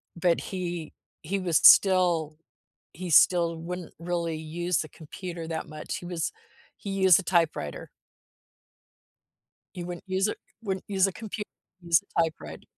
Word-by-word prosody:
but 170 0 +2
he 175 -4 -5 0.3
he 195 +5 -2
would 185 -2 -3
s 160 - +3
still 175 -5 +5 0.6
he 180 +1 -6
still 170 0 +5
wouldn't 175 +1 -6
really 170 -2 -2
use 170 +2 -2
the 155 - -3
computer 170 +2 -8
that 160 -1 -4
much, 155 0 -6
he - - -9
was 175 -3 -2 0.5
he 200 - -6
used 190 -3 +5
a 195 - -5
typewriter. 165 - 0 1.9
He 175 - -5
wouldn't 175 -1 -7
use 190 +2 +1
it - - -3 0.3
wouldn't 190 -3 -3
use 195 -1 +2
a 195 - -4
compu 220 +2 -6 0.4
use 170 -2 +3
a 170 - -1
typewrite 160 -1 -4
175 Hz, 150 wpm, -27 LUFS, 165-185 Hz, 1.9 s, still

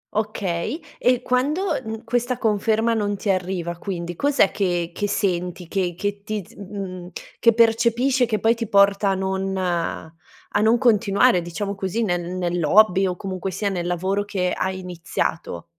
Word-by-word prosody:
Okay, 210 - -2 0.2
e 250 0 +2
quando, 270 +8 +1 0.2
mhmm, 220 +1 -6
questa 245 +1 -1
conferma 220 0 +1
non 205 -2 0
ti 200 0 0
arriva 180 -2 -2
quindi, 175 -3 -5
cos'è 280 - +3
che 175 -3 -1
che 205 +3 -2
senti 180 -4 -1
che 180 -2 -1
che 205 +1 -3
ti 215 -2 -3
z - - -18
mhmm, 185 -3 -7 0.3
che 230 -1 +5
percepisce, 235 +3 +3
che 215 -2 0
poi 225 +1 +4
ti 230 -2 -4
porta 200 0 +4
a 195 - +2
non 190 0 -2
a 170 +1 -3
non 225 +2 +4
continuare, 215 -3 +3
diciamo 200 +4 -4
così, 195 +3 -2
nel 175 -4 0 0.2
nell'hobby 180 +3 +3
o 180 - -2
comunque 190 0 -4
sia 200 +3 -2
nel 175 -3 -3
lavoro 190 +3 0
che 185 -3 -1
hai 190 0 -2
iniziato? 165 - -3
195 Hz, 160 wpm, -22 LUFS, 180-220 Hz, 0.3 s, che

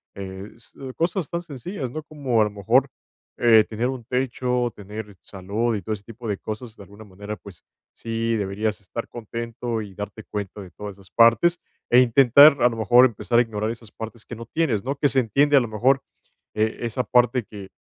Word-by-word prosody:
Eh, 95 +1 -8
s 115 - -14 0.2
cosas 170 0 -1
tan 170 0 -3
sencillas, 145 - -6
¿no?, 155 - -5
como 140 -7 0
a 105 - +4
lo - - -2
mejor, 100 -1 +2 0.5
eh, 115 -2 +6
tener 115 +3 -3
un 130 -2 -4
techo, 125 0 -1
tener 105 0 -8
salud 105 +5 -2
y 100 - -3
todo 110 - -2
ese 100 -2 -7
tipo 115 +2 -10
de 100 -2 -1
cosas, 110 +1 -7
de - - -14
alguna 100 +2 -14
manera, 100 +2 -7
pues, 95 -5 -14 0.3
sí 115 0 -2
deberías 105 +1 -2
estar 115 +4 -6
contento 115 0 -5
y 100 - -11
darte 105 +2 -7
cuenta 105 -1 -6
de 90 -2 -11
todas 105 -2 -8
esas 100 -1 -20
partes, 120 +10 +4 0.3
eh, 125 - +7
intentar, 135 +4 +7
a 120 - +6
lo 115 - -6
mejor, 115 +3 +6
empezar 120 0 0
a - - +7
ignorar 110 -1 -3
esas 115 -2 -8
partes 110 0 -9
que 120 - -8
no 115 0 -9
tienes, 125 -11 0
¿no? 135 +3 -2
Que 145 - +3
se 135 - +2
entiende, 140 +5 +3
a 140 - +8
lo 120 - -2
mejor, 125 +5 +2 0.5
eh, 110 +1 0
esa 120 +1 -2
parte 125 0 +2
que 100 -2 -11
115 Hz, 205 wpm, -23 LUFS, 105-125 Hz, 0.5 s, a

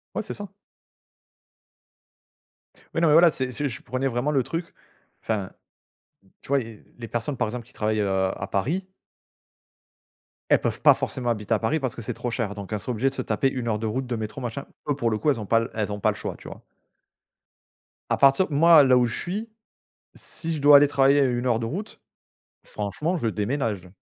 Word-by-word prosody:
Ouais, - - 0
c'est - - -6
ça. 205 -2 -8 2.5
Oui, 165 - +1
non, 170 - +4
mais, 150 - +5
voilà. 170 +2 +7
C'est 130 -3 -3
c'est 145 +3 -2
je 110 - -7
prenais 130 +2 -2
vraiment 125 +3 -1
le 140 -3 +2
truc. 165 +6 -5 0.5
Enfin, 105 -4 -2 0.9
tu - - -17
vois, 140 - +3
il 115 - -7
y - - -20
a - - -23 0.2
les 115 - -7
personnes, 120 +5 -3
par - - 0
exemple, 120 0 -6
qui - - -17
travaillent, 110 0 -1
heu, 100 - 0
à 95 0 -1
Paris 165 - -1 1.6
elles - - +6
peuvent - - -3
pas - - +7
forcément 125 -2 -3
habiter 105 -1 -1
à 110 - +2
Paris 145 +8 0
parce 130 -5 -3
que - - -7
c'est 105 - -4
trop 120 - -4
cher 115 -4 -2
donc 100 +1 -7
elles 105 - -1
sont 125 - -4
obligées 130 +4 0
de - - -14
se 130 - -3
taper 125 +3 0
1 125 -3 -4
heure 110 -2 +1
de 110 - -3
route, 130 +4 -2
de 120 - -2
métro, 110 +3 -5
machin. 120 +2 -5 0.2
Eux, 145 - +2
pour 120 -4 0
le 110 - -1
coup, 150 - +1
elles 135 -5 +1
ont 105 - -5
pas 115 - +3
l 115 - -3
elles 105 -2 -2
ont 105 - -4
pas - - +2
le - - -8
choix. - - -5
Tu - - -13
vois? - - -10 1.5
À - - +2
partir 140 +7 +5
moi, 160 +1 +7
là 130 -2 +5
où 125 - +4
je 115 - -3
suis, 210 +6 -4 0.6
si 165 0 -5
je 150 - -5
dois 145 0 +9
aller 145 0 +5
travailler 140 0 +4
à 140 - +5
1 125 -1 0
heure 120 - +3
de 115 - -3
route. 195 - -6 0.7
Franchement, 110 - -3
je 140 - -2
déménage. 105 -3 -2
125 Hz, 225 wpm, -25 LUFS, 110-145 Hz, 2.5 s, dois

